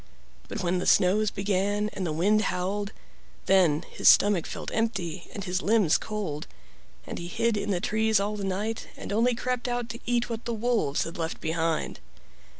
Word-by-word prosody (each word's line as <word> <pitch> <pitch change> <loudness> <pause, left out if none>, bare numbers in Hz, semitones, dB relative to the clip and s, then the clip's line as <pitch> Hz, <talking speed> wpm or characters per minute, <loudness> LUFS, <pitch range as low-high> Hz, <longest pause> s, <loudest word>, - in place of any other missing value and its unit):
But 220 -4 -4
when 180 +1 +1
the - - -3
snows 205 +3 +4
began 205 +1 0
and 190 -3 -4
the - - -1
wind 200 +7 +3
howled, 200 +3 -2 0.5
then 175 -5 +4
his - - +4
stomach 200 -5 +5
felt - - -6
empty 190 -7 -2
and 200 - -6
his 185 0 -1
limbs 205 -7 +3
cold, 195 -9 -4 0.6
and - - -6
he 170 - -5
hid 230 +5 0
in 200 -3 -1
trees 220 0 +2
all 205 +1 -1
the 205 - -5
night 205 +4 -2
and - - -5
only 235 +3 +3
crept 250 0 -2
out 240 -1 -2
to 235 - -6
eat 240 0 +1
what 230 -1 -5
the 235 - -2
wolves 225 - +1
had 165 +1 -7
left 165 0 -3
behind. 160 0 -1
200 Hz, 180 wpm, -27 LUFS, 180-220 Hz, 0.6 s, stomach